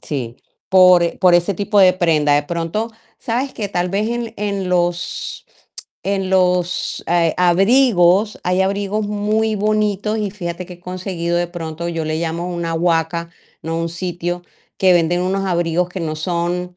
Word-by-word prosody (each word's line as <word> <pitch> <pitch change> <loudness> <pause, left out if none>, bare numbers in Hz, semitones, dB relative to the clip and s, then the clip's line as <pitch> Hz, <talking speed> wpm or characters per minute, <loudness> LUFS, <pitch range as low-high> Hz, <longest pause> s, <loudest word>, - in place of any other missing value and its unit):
Sí, 125 -5 -5 0.3
por 185 -2 +6
e 170 - -2
por 180 -1 +5
ese 175 +3 +2
tipo 205 +2 0
de 185 -1 +7
prenda. 155 -5 +2
De 145 - +2
pronto, 170 +8 -3 0.3
¿sabes 255 +4 -2
qué? 205 -3 -4
Tal 180 -1 -1
vez 205 +3 0
en 235 -1 -3
en 200 -2 -2
los 175 -1 -2 0.6
en 195 -1 -1
los, 180 -1 +1
eh, 170 -2 +2
abrigos, 195 +1 +3
hay 180 +1 +1
abrigos 200 +2 -1
muy 215 +1 0
bonitos, 210 0 0
y 205 -2 -2
fíjate 175 -3 -5
que 180 - -10
he 175 - -13
conseguido, 180 -1 -3
de 175 0 +1
pronto, 170 -1 -6
yo 165 -2 -3
le 155 0 -2
llamo 170 +2 -3
una 170 -1 -3
guaca, 165 0 0 0.3
¿no? 165 0 -3
Un 165 0 -2
sitio 175 0 -4 0.4
que 185 -1 +5
venden 175 +1 +2
unos 195 +1 -1
abrigos 175 -1 0
que 180 +1 -6
no 155 -2 -3
son, 175 +2 -2
180 Hz, 170 wpm, -19 LUFS, 170-200 Hz, 0.6 s, de